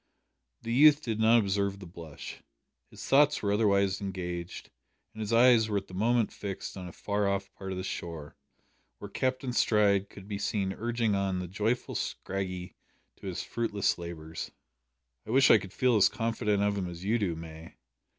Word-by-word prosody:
The 115 - -2
youth 150 +3 +6
did 110 -2 -2
not 110 +1 +6
observe 100 -2 0
the 95 - -10
blush. 85 -4 -10 0.5
His - - -10
thoughts 145 0 +4
were 100 - +1
otherwise 100 -2 +2
engaged, 90 -3 -5 0.4
and 110 - -12
his 105 0 -3
eyes 115 -1 +5
were 105 - 0
at 100 - -3
the - - -15
moment 115 +4 +1
fixed 100 -2 -6
on 95 -2 -7
a - - -8
far 100 +3 -1
off 100 0 -2
part 95 -1 -7
of 95 - -4
the 95 - -3
shore, 80 -5 -6 0.6
where 100 +9 -9
Captain 130 +2 -1
Stride 100 -4 +3
could 100 -1 -12
be 100 -1 -4
seen 100 -2 -1
urging 115 -1 -1
on 100 -1 0
the 90 0 -4
joyful 105 +7 -1
Scraggy 90 -2 -4 0.4
to - - -9
his - - -3
fruitless 105 -6 -1
labours. 80 -2 -6 0.7
"I - - -14
wish 130 +4 +5
I - - +7
could 95 -1 -9
feel 125 +2 +2
as 100 - +6
confident 115 -3 0
of 100 0 +1
him 90 - -2
as 85 0 -8
you 115 +4 +2
do, 90 -6 -1
May. 80 0 -10
100 Hz, 185 wpm, -29 LUFS, 95-115 Hz, 0.7 s, I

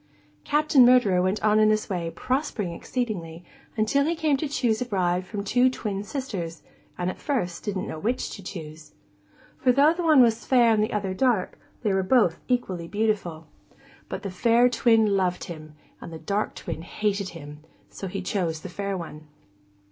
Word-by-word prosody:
Captain 295 -2 +4
Murderer 240 -7 +5
went 185 +3 -1
on 215 0 +4
in 215 0 +5
this 215 0 +1
way, 175 -4 -3
prospering 250 - -2
exceedingly, 175 -7 -4 0.3
until 220 +6 +2
he 330 +4 0
came 315 -3 +1
to 295 +3 -2
choose 240 -6 0
a - - 0
bride 185 -4 0
from 205 -1 -4
two 245 +5 +3
twin 205 -5 -4
sisters, 205 - -5 0.3
and 180 - -2
at - - -12
first 180 - -2
didn't 200 -3 -3
know 160 - -6
which 235 +8 -2
to 200 - -8
choose. 155 -5 -9 0.7
For, 255 - +4
though 285 +5 +5
one 320 -6 +5
was 230 -1 +1
fair 240 -3 +4
and 215 - +2
the 215 - -2
other 200 -3 -2
dark, 230 -3 0 0.2
they 210 -4 +1
were 190 - +2
both 190 -3 +3
equally 190 -9 -1
beautiful. 200 -6 -1 0.6
But - - -5
the 195 - -4
fair 235 +6 +4
twin 230 -2 +3
loved 180 -2 0
him, 155 -4 -9 0.3
and - - -8
the 165 - -7
dark 200 +6 -2
twin 165 -4 -6
hated 200 +2 -2
him, 145 -1 -10 0.3
so 195 - -6
he 190 +1 -5
chose 170 -5 -2
the 185 - -7
fair 200 +1 -3
one. 155 -3 -9
205 Hz, 180 wpm, -25 LUFS, 180-245 Hz, 0.7 s, Murderer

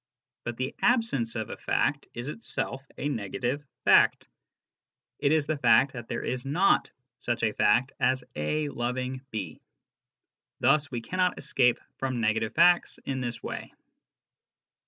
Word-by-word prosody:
But 120 -1 -4
the 130 +1 -2
absence 225 - +2
of 110 -2 -3
a - - -6
fact 145 0 0
is 120 +2 -5
itself 150 -5 -4 0.2
a 145 - -2
negative 125 +2 -2 0.2
fact; - - +5 0.9
it 140 - +2
is 155 -2 +3
the 155 -1 -2
fact 120 +2 +5
that 120 -3 -7
there - - -3
is 125 0 -2
not 165 +8 +2 0.3
such 120 -1 -2
a 110 -2 +2
fact 120 +7 +3
as 130 0 +2
A 145 - -1
loving 125 +1 -3
B. 95 -9 -5 1.0
Thus, 145 +1 +3
we 120 -2 -4
cannot 180 +8 0
escape 125 -2 +2 0.2
from 130 -2 -2
negative 110 0 0
facts 175 +1 +4
in 130 -1 -2
this 120 -1 -4
way. - - -6
130 Hz, 145 wpm, -28 LUFS, 120-145 Hz, 1.0 s, fact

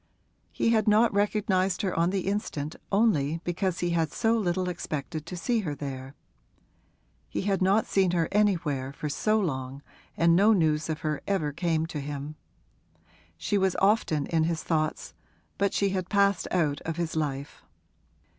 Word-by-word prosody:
He - - 0
had 220 -1 +2
not 215 +2 +4
recognised 200 -2 +1
her 190 - 0
on 170 +1 +2
the 190 0 -1
instant 175 -6 -3 0.2
only 170 -8 +2
because 180 +1 -2
he 175 -1 0
had 165 -3 0
so 225 +1 +1
little 185 -4 0
expected 155 -3 -4
to 180 - -6
see 230 +8 0
her 160 -9 -3
there; 135 -1 -7 1.1
he - - -2
had 195 -1 0
not 195 +4 +3
seen 190 -2 +2
her 170 -2 +1
anywhere 165 -10 +1
for 150 - -4
so 215 +9 +1
long, 135 -6 -3 0.3
and 170 0 +4
no 205 +5 +5
news 155 -4 +1
of 155 - -3
her 150 -2 -2
ever 175 -7 0
came 160 +1 0
to 160 -2 -5
him. 145 +1 -5 1.0
She 205 - 0
was 190 -1 +1
often 195 -7 +2
in 160 -1 +1
his 165 -1 -2
thoughts, 155 -2 -1 0.5
but 200 0 +2
she 200 - +1
had 185 -2 -3
passed 200 -2 +2
out 155 -5 0
of 165 0 -4
his 170 -2 -2
life. 145 -3 -3
170 Hz, 165 wpm, -27 LUFS, 155-200 Hz, 1.1 s, no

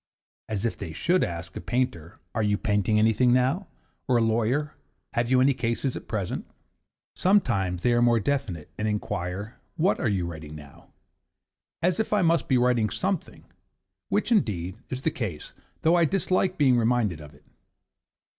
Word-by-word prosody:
(as 105 0 -2
if 115 - 0
they 80 - -6
should 175 - +2
ask 90 +2 -5
a - - -5
painter 120 -10 -2 0.2
'Are 110 - 0
you 105 -1 +2
painting 105 0 +1
anything 110 +3 +4
now?' 130 +10 +2 0.4
or 125 - +3
a - - +3
lawyer 120 +7 +1 0.4
'Have 120 0 0
you 130 0 +4
any 135 +2 +4
cases 120 +2 -2
at - - -8
present?'). 100 -5 -3 0.7
Sometimes 100 - +1
they 120 - +3
are 120 - +3
more 120 -1 +4
definite 105 - -2
and 105 - 0
inquire 100 0 -3 0.2
'What 175 +4 +2
are 120 - +1
you 95 -4 0
writing 80 -3 -7
now?' 75 -2 -14 0.9
as 180 +2 +2
if 220 - 0
I 205 -3 +3
must 165 0 +2
be 130 - +3
writing 120 -3 +2
something 185 - -3 0.6
which, - - 0
indeed, 100 - 0
is 130 +1 -5
the 160 - +1
case, 110 - -5 0.3
though 160 - +4
I 170 -1 +5
dislike 185 +1 0
being 130 -4 +4
reminded 110 -8 +1
of 75 0 -12
it. 75 - -22
120 Hz, 170 wpm, -26 LUFS, 95-140 Hz, 0.9 s, I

